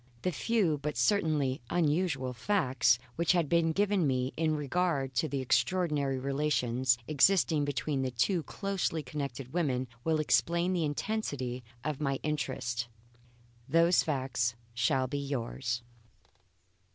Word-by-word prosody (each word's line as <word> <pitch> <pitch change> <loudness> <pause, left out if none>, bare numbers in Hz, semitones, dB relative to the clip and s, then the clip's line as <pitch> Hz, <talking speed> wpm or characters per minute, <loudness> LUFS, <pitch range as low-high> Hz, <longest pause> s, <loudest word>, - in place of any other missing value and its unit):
The 180 - +1
few, 180 -4 +1
but 150 -2 -3
certainly 145 - +1
unusual, 155 -5 0
facts 130 - +2 0.2
which 170 +2 +3
had 170 -4 +2
been 165 +1 +2
given 200 -2 +2
me 130 0 0
in 160 -1 +1
regard 145 -2 0
to 130 +6 0
the 140 -2 -2
extraordinary 140 +2 +1
relations 130 -3 +1
existing 155 0 +3
between 145 0 -1
these 130 -2 -2
two 145 +9 +1
closely 190 -3 -2
connected 135 -1 -5
women 130 -7 0 0.2
will 160 -1 +1
explain 170 +4 +2
the 170 -3 +1
intensity 145 - -3 0.2
of 150 0 -3
my 135 -2 +1
interest. 130 -5 -2 0.8
Those 170 +3 +5
facts 130 -5 -1 0.2
shall 120 +3 +1
be 140 +3 -3
yours. 125 -3 -3
145 Hz, 130 wpm, -31 LUFS, 130-165 Hz, 0.8 s, Those